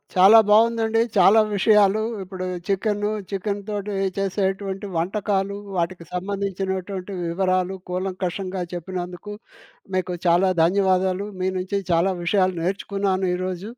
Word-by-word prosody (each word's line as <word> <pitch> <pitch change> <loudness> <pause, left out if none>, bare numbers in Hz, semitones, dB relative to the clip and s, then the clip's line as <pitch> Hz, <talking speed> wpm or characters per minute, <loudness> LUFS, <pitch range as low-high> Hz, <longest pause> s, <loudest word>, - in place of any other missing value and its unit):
చాలా 195 +5 +8
బావుందండి. 225 +1 +4 0.2
చాలా 200 +4 +7
విషయాలు 210 0 +4 0.2
ఇప్పుడు 185 0 -6 0.2
చికెను, 205 +1 0 0.2
చికెన్‌తోటి 205 +1 -3 0.2
చేసేటువంటి 195 0 -2
వంటకాలు, 200 +2 -1 0.2
వాటికి 170 0 -2
సంబంధించినటువంటి 190 0 -3
వివరాలు, 185 +2 0
కూలంకషంగా 185 0 -3
చెప్పినందుకు, 180 +3 -6 0.6
మీకు 185 -1 -1
చాలా 175 +3 +4
ధన్యవాదాలు. 190 +1 +2
మీ 185 - +1
నుంచి 195 +2 -2
చాలా 170 +3 +3
విషయాలు 185 0 +2
నేర్చుకున్నాను 195 0 -1
ఈరోజు. 185 +3 -4
190 Hz, 100 wpm, -23 LUFS, 185-200 Hz, 0.6 s, చాలా